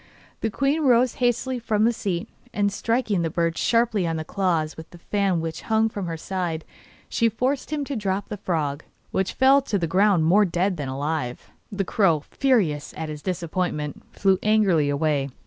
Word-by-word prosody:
The 225 - -1
queen 275 +8 0
rose 250 -3 +4
hastily 245 +1 +1
from 215 -2 0
the 235 +2 +4
seat, 180 -6 -3 0.3
and 205 -1 +1
striking 225 -3 0
the 165 - 0
bird 165 0 0
sharply 225 -5 +2
on 165 - -1
the 160 - -3
claws 165 -3 -1
with 160 - -10
the 175 - -13
fan 190 -1 0
which 160 -1 -4
hung 220 0 +3
from 200 -4 -5
her 165 -1 -4
side, 170 -2 -3 0.4
she 230 -1 +2
forced 255 +5 -1
him 295 -2 -2
to 280 - -4
drop 200 -2 -2
the 210 - -4
frog, 155 -6 -2 0.3
which 190 -1 -1
fell 270 +2 +5
to 225 -6 -1
the 170 -3 -1
round 190 -1 +3
more 195 +6 +5
dead 180 0 0
than 140 -3 -4
alive. 140 -2 -3 0.2
The 195 -1 -2
crow, 170 -7 +2
furious 200 - +1
at 160 0 -4
his 150 -1 -6
disappointment, 175 -4 -3
flew 195 -2 +2
angrily 195 -9 +3
away. 145 -1 0
190 Hz, 185 wpm, -24 LUFS, 160-220 Hz, 0.4 s, fell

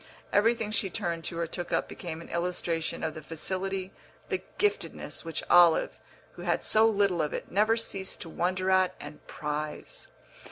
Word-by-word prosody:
Everything 225 0 +3
she 215 -2 +1
turned 170 -2 -2
to 165 - -3
or 170 - 0
took 175 +1 -5
up - - +1
became 165 -2 -6
an - - -11
illustration 170 -2 -1
of 160 -1 -1
the 155 - -7
facility, 185 +4 -3 0.4
the - - 0 0.2
"giftedness," 415 +1 -1
which 165 -2 -3
Olive, 175 -2 +6 0.3
who - - -11
had - - 0
so 220 +1 +5
little 200 -5 +2
of 150 - -1
it, - - -6
never 215 +4 +4
ceased 195 -4 -3
to - - -6
wonder 185 +3 0
at 185 -1 +4
and 150 +1 -9
prize. 150 0 -4
180 Hz, 170 wpm, -29 LUFS, 165-195 Hz, 0.4 s, Olive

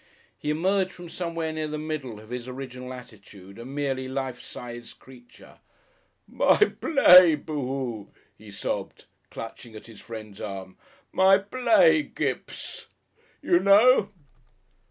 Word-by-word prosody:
He 150 - -5
emerged 185 +5 +1
from 175 -2 -11
somewhere 165 -2 -4
near 155 -1 -3
the 155 0 -4
middle 150 -8 -5
of 110 +2 -15
his 125 0 -5
original 125 -1 -8
attitude, 100 -5 -13
a 115 - -8
merely 135 -1 -3
life 130 -1 -4
size 120 -1 -9
creature. 125 -2 -18 0.7
"My - - +3
play, 185 - +6
boo 150 0 -5
hoo!" 125 -6 -5 0.2
he 105 +1 -15
sobbed, 100 - -5 0.2
clutching 115 0 -9
at 110 - -11
his 115 -2 -13
friend's 110 -3 -10
arm. 95 -2 -7 0.4
"My 190 +1 +5
play, 255 - +3
Kipps! - - -3
(sob) - - -10 0.5
You 350 -1 +3
know?" 205 - +5
135 Hz, 135 wpm, -25 LUFS, 115-175 Hz, 0.7 s, play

